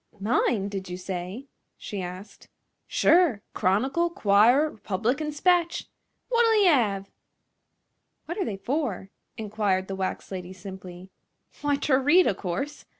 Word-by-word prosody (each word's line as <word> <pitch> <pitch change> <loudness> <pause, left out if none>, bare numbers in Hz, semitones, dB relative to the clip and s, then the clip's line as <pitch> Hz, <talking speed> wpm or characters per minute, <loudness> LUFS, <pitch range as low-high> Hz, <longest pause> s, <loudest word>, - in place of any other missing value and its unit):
"Mine, 210 -1 +1
did 195 -2 -5
you 180 - -5
say?" 185 +6 -5 0.3
she 205 -3 -6
asked. 185 +3 -9 0.4
"Sure! 325 - +3
Chronicle, 265 - +1
'Quirer, 245 +4 +4
R'public 220 +7 -2
'n' 300 0 -2
'Spatch! 345 +3 +1 0.4
Wot'll 460 -2 +4
ye - - +5
'ave?" 200 - +1 1.1
"What 345 +5 -5
are 380 - 0
they 200 - -4
for?" 235 - -3 0.3
inquired 205 -3 -1
the 195 - -4
wax 190 +1 -4
lady, 185 -1 -6
simply. 185 -1 -10 0.5
"W'y, 290 -1 +1
ter 265 -3 +2
read, 340 +7 +5
o' - - +2
course. 200 +11 -4
210 Hz, 135 wpm, -26 LUFS, 190-295 Hz, 1.1 s, ye